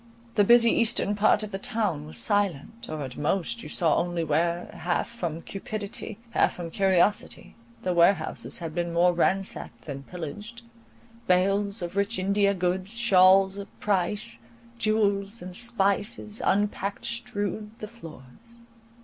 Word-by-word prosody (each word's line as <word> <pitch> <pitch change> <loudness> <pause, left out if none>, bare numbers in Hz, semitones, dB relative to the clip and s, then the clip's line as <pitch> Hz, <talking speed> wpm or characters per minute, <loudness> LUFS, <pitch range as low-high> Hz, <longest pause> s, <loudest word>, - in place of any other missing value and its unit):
The 205 - +4
busy 235 +2 +6
eastern 230 -3 +2
part 210 +1 +3
of 210 - -6
the 195 - -4
town 200 -11 -2
was 155 - -4
silent, 205 0 0
or 155 -1 -4
at 130 -2 -8
most 195 +9 -1
you - - -9
saw 165 -4 +2
only 175 -1 -1
where, 170 +3 0
half 175 0 -1
from 170 -9 -5
cupidity, 200 +1 -6
half - - +2
from 170 -2 -7
curiosity, 195 +1 +1 0.3
the 180 - 0
warehouses 170 -1 +2
had 165 -2 -6
been 170 0 -2
more 175 +1 +4
ransacked 175 -9 -1
than 140 -2 -6
pillaged: 205 +10 -8 0.6
bales 195 +2 +2
of 175 +2 -5
rich 200 +3 0
India 200 +1 +2
goods, 185 +4 -2
shawls 195 -3 +5
of 200 - -7
price, 210 +3 -1 0.4
jewels, 205 -1 +1
and 180 0 -8
spices, 210 -1 0
unpacked, 200 0 0
strewed 210 -3 -3
the 215 - -7
floors. 220 - -14
195 Hz, 140 wpm, -26 LUFS, 175-210 Hz, 0.6 s, busy